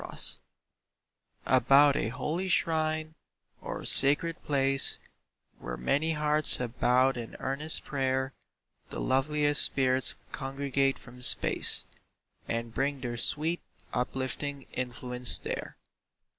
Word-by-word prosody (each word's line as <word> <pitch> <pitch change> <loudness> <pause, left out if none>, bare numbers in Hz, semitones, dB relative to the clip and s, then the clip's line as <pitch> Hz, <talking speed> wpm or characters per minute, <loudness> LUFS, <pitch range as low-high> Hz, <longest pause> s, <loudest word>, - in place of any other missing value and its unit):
SHRINES - - -5 1.1
About 135 +3 +2
a - - -4
holy 155 +10 -6
shrine 155 -2 -2 0.5
or - - -9
sacred 150 +4 +7
place, 135 -1 +2 0.6
Where - - -9
many 145 - -3
hearts 150 0 +4
have 125 -1 -9
bowed 130 +1 0
in 115 -1 -10
earnest 145 +4 -2
prayer, 130 -1 -4 0.6
The - - -8
loveliest 145 +2 0
spirits 130 -1 0 0.2
congregate 135 -1 -4
from 125 0 -17
space, 125 - +6 0.6
And 115 0 -6
bring 135 +2 -4
their 120 -2 -7
sweet, 155 +8 -3 0.3
uplifting 135 +2 -6
influence 125 -1 +1
there. - - -9
135 Hz, 105 wpm, -26 LUFS, 125-150 Hz, 1.1 s, sacred